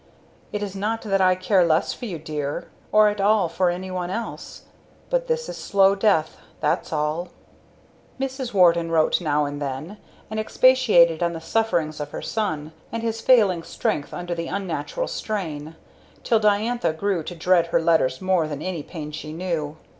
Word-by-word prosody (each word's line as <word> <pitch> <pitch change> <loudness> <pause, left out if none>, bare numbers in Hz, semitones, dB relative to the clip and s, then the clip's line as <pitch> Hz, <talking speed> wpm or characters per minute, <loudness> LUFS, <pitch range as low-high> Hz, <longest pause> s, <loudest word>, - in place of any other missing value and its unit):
It 210 0 -3
is 200 -1 -5
not 215 +3 -2
that 195 -3 +1
I 185 -1 +5
care 185 0 +3
less 160 -1 +2
for 245 - -8
you 185 -7 -4
dear, 150 -2 -4 0.2
or 215 0 +6
at 205 -1 -3
all 205 -2 +3
for 180 +2 +1
anyone 180 0 -3
else, 230 +5 -6 0.5
but - - +1
this 480 0 -1
is - - -6
slow 195 -1 +3
death 195 -6 +1 0.2
that's 150 - 0
all." 155 +3 -1 0.9
Mrs. 265 -2 -3
Warden 170 -3 +4
wrote 165 +1 +2
now 150 -2 +1
and 145 0 -5
then 145 +9 -5 0.3
and 215 - -2
expatiated 215 -9 +4
on 170 0 +1
the 165 - -5
sufferings 165 -4 0
of 145 -1 -4
her - - -6
son, 160 -8 -2 0.2
and 230 0 -4
his 225 -1 -2
failing 210 -9 +4
strength 150 -2 -2
under 175 0 -4
the 170 -1 -4
unnatural 195 - -3
strain, 160 -7 -4 0.5
till 225 - +3
Diantha 215 -1 +1
grew 190 +1 -1
to 175 +3 -7
dread 170 0 +3
her 170 - +2
letters 160 -6 +2
more 185 -4 +2
than 150 0 -5
any 185 -4 -3
pain 150 -1 -7
she 150 0 -7
knew. 160 -3 -3
180 Hz, 175 wpm, -23 LUFS, 160-210 Hz, 0.9 s, or